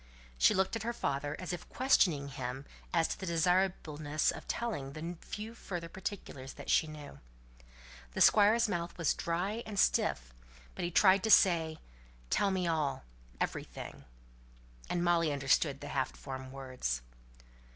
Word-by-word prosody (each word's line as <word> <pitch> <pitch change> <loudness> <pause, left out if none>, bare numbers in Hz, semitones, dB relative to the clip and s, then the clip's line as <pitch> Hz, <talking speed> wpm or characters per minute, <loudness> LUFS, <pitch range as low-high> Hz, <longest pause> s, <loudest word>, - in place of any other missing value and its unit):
She - - +5
looked 190 +3 +1
at 225 - -3
her 235 +3 -2
father, 145 -7 -2
as 185 -1 -4
if 175 - -7
questioning 175 - +3
him 130 0 -5 0.3
as 165 -1 +3
to - - -4
the 190 - -5
desirableness 165 -3 +1
of - - -9
telling 175 -13 -3
the 165 +3 -5
few 215 +2 -6
further 175 -7 -6
particulars 170 -8 -6
that - - -5
she 160 - +4
knew. 150 - -10 0.9
The - - -2
Squire's 215 +3 +6
mouth 170 -3 -3
was 165 -3 +2
dry 185 +7 -2
and 210 -2 -7
stiff, - - +2 0.4
but - - -5
he 175 - 0
tried 190 +2 +5
to - - +1
say, 165 -6 +5 0.5
"Tell 200 - +3
me 190 -2 0
all, 155 - 0 0.4
everything." - - -5 0.8
And 175 -1 0
Molly 170 -3 +3
understood 140 +1 +1
the - - -6
half 130 -1 -1
formed 130 -1 -7
words. 130 - -3
165 Hz, 150 wpm, -32 LUFS, 140-190 Hz, 0.9 s, Squire's